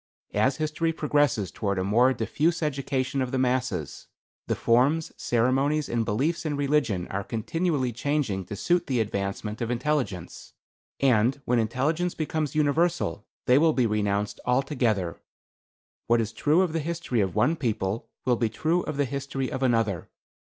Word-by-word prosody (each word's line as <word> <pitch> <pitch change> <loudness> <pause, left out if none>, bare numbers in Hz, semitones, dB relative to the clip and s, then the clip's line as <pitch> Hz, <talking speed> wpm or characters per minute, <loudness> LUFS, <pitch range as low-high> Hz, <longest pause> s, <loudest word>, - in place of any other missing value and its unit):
As 130 +1 +2
history 160 +2 0
progresses 145 - +1
toward 100 -2 -2
a 95 - 0
more 120 +7 +4
diffuse 160 +8 0
education 135 -2 -1
of 130 - -1
the 135 - 0
masses, 130 - -1 0.4
the - - 0
forms, 140 +8 +2
ceremonies 135 +5 +1
and 115 -1 0
beliefs 145 +11 0
in 150 -3 -2
religion 140 -10 +1
are 100 +1 -2
continually 135 - -1
changing 120 -7 -1
to 105 - -6
suit 175 - +1
the 130 -3 0
advancement 105 +1 -3
of 115 - -1
intelligence; 125 - -2 0.5
and 130 0 +3
when 120 0 +2
intelligence 145 +10 0
becomes 155 -1 -2
universal, 155 - +1 0.2
they 125 +2 +5
will 160 0 +4
be 125 -4 +2
renounced 105 -1 -1
altogether. 125 - 0 0.9
What 120 0 +4
is 110 -1 -1
true 150 +10 +3
of 175 -4 -2
the 165 - 0
history 160 -7 -1
of 95 -2 -1
one 145 +10 +3
people 110 -6 -2 0.2
will 125 -2 +3
be 115 -1 +1
true 160 +10 0
of 155 -4 -5
the 145 - +2
history 135 0 -3
of 130 - -4
another. 115 -8 +1
130 Hz, 160 wpm, -26 LUFS, 110-150 Hz, 0.9 s, they